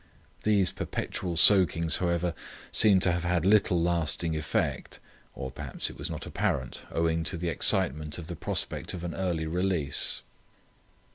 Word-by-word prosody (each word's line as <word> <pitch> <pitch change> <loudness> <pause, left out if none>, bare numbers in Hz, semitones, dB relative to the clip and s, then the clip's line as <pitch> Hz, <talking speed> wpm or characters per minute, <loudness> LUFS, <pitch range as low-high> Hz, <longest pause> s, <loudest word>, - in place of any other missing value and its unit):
These 100 -4 +2
perpetual 85 -2 -4
soakings, 85 -4 +6
however, 85 -1 -1 0.4
seemed 100 -4 +5
to 90 - +4
have 85 0 -2
had 90 -1 0
little 100 -3 +3
lasting 85 -1 -1
effect, 75 -1 -3 0.4
or 65 -1 -6
perhaps - - -5
it - - -14
was - - -4
not - - -6
apparent 65 -1 -3
owing 80 0 0
to 90 +3 -2
the 85 0 -3
excitement 75 -1 +1
of 85 - -8
the 85 +1 -6
prospect - - -2
of 85 - -8
an 85 -1 -4
early 85 -4 -2
release. 85 -4 0
85 Hz, 150 wpm, -27 LUFS, 80-90 Hz, 0.4 s, soakings